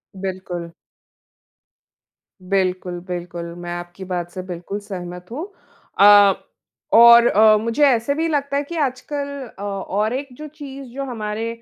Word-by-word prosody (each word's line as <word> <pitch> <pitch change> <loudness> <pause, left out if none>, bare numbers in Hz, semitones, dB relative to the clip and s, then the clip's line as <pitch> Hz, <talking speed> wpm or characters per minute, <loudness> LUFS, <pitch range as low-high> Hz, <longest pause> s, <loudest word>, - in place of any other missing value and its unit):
बिल्कुल। 185 -2 -5 1.7
बिल्कुल, 185 -1 -1
बिल्कुल। 175 -1 -5
मैं 175 0 -7
आपकी 175 +2 -8
बात 175 -2 -3
से 185 - -6
बिल्कुल 180 +4 -5
सहमत 180 -3 -8
हूँ। 300 +9 -4 0.5
अ, 205 -1 +8 0.6
और 235 +1 +9
अ, 215 +1 +5
मुझे 230 +7 0
ऐसे 250 0 +2
भी 325 +2 0
लगता 280 -3 -1
है 285 - 0
कि 340 +4 -8
आजकल 280 0 -2 0.3
औ - - -6
और 205 +2 -2
एक 275 +2 -3
जो 305 0 -7
चीज़ 280 -2 -9
जो 275 +1 -4
हमारे 225 -2 -4
205 Hz, 140 wpm, -21 LUFS, 180-265 Hz, 1.7 s, और